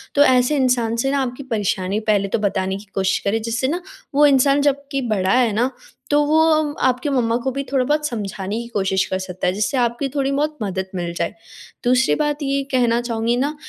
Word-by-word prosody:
तो 285 - +6
ऐसे 255 +2 +3
इंसान 245 -3 +1
से 270 +4 0
ना 280 -1 +1
आपकी 255 +2 -4
परेशानी 205 -4 -1
पहले 200 -2 +2
तो 195 - -1
बताने 190 -2 -1
की 205 - -12
कोशिश 190 -1 +1
करें, 220 +3 +1
जिससे 230 +3 -1
ना 345 +5 -2 0.3
वो 295 +1 +6
इंसान 280 0 +4
जबकि 280 -1 0
बड़ा 190 -3 +1
है 245 -4 +3
ना, 245 +5 +1 0.4
तो 295 0 +3
वो 310 +2 +3
अ, 310 -2 +1
आपकी 255 +3 0
मम्मा 235 -3 +1
को 265 - 0
भी 275 +2 -3
थोड़ा 260 -2 +2
बहुत 300 +1 +1
समझाने 205 -3 -4
की 235 - -8
कोशिश 190 -4 0
कर 185 - -3
सकता 185 -1 -4
है, 180 - +1
जिससे 210 +7 -1
आपकी 245 +3 0
थोड़ी 275 -1 0
बहुत 300 +2 -1
मदद 190 -1 -3
मिल 175 -1 -3
जाए। 170 - -2 0.5
दूसरी 250 +2 +3
बात 295 -1 0
ये 275 0 0
कहना 240 -2 +2
चाहूँगी 235 0 -1
ना 290 +4 -1
245 Hz, 215 wpm, -20 LUFS, 205-275 Hz, 0.5 s, तो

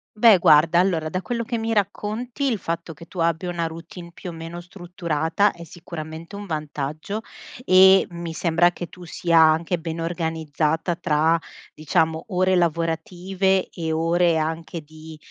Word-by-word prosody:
Beh, 215 -2 +7
guarda, 160 +1 +5
allora, 175 -4 +1
da 185 +4 -3
quello 235 +5 -3
che 235 +1 -3
mi 225 0 -2
racconti, 220 +5 -2
il 225 - 0
fatto 170 -2 -4
che 155 +2 -13
tu 180 - -10
abbia 170 +2 0
una 170 -1 -2
routine 165 +2 -10
più 175 +1 -8
o - - -10
meno 165 +1 -7
strutturata 175 0 -1
è 170 - -11
sicuramente 165 +1 -9
un 205 0 -7
vantaggio 155 +4 -4 0.4
e 190 -1 +7
mi 170 -2 -6
sembra 170 +1 +2
che 175 0 -7
tu 180 -1 -12
sia 170 0 +2
anche 160 +2 +4
ben 165 0 -5
organizzata 160 -1 -1
tra, 160 0 +2 0.3
diciamo, 160 +1 0
ore 185 -1 +2
lavorative 175 +3 0
e 165 -3 -4
ore 165 +1 +2
anche 160 +1 -3
di, 155 +1 -13
170 Hz, 155 wpm, -23 LUFS, 160-185 Hz, 0.4 s, Beh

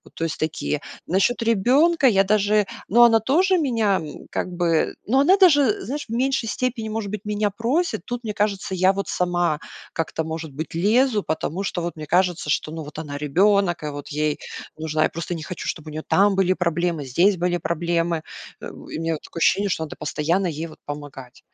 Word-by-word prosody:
То 165 - -4
есть 160 - -4
такие. 155 -1 -2 0.3
Насчёт 195 +7 +2
ребёнка 265 - +3
я 195 -5 +4
даже 210 0 +2 0.2
ну, 235 +4 +5
она 225 -1 +6
тоже 355 - +3
меня 225 - +1 0.3
как - - -2
бы, 170 -2 +1
ну, 260 +5 +3
она 365 +8 +5
даже, 365 +2 +5
знаешь, 290 +3 -4
в - - -4
меньшей 255 -1 0
степени, 235 -3 -2
может 215 -2 -3
быть, 210 0 -6
меня 210 -1 0
просит. 270 - -1
Тут, 245 -1 -5
мне 210 -2 -3
кажется, 200 -2 -1
я 185 +1 +4
вот 200 0 -4
сама 175 -3 0 0.3
как-то, 160 0 -2
может 160 -1 -5
быть, 155 +2 -6
лезу, 215 +5 +3
потому 160 +4 -3
что 180 -3 -2
вот 170 - -4
мне 155 -1 -8
кажется, 175 -3 +1
что, 155 - 0
ну, 160 -1 -6
вот 150 - -10
она 145 -2 -5
ребёнок, 175 +3 +2
и - - -2
вот 145 0 -8
ей 150 0 0 0.4
нужна 155 0 0
Я - - +2
просто 170 +2 -4
не 160 - -6
хочу, 180 - -6
чтобы 155 -2 -4
у - - -8
нее 155 - -5
там 200 0 +4
были 190 -1 +3
проблемы, 170 -4 -1
здесь 175 +10 +3
были 175 0 0
проблемы. 170 -1 -1 0.4
У - - -9
меня 165 -1 -2
такое 165 - -9
ощущение, 200 +4 +3
что 160 -3 -1
надо 155 - -7
постоянно 165 +5 0
ей 160 0 -4
вот 155 - -14
помогать. 145 -3 -8
185 Hz, 200 wpm, -23 LUFS, 160-220 Hz, 0.4 s, она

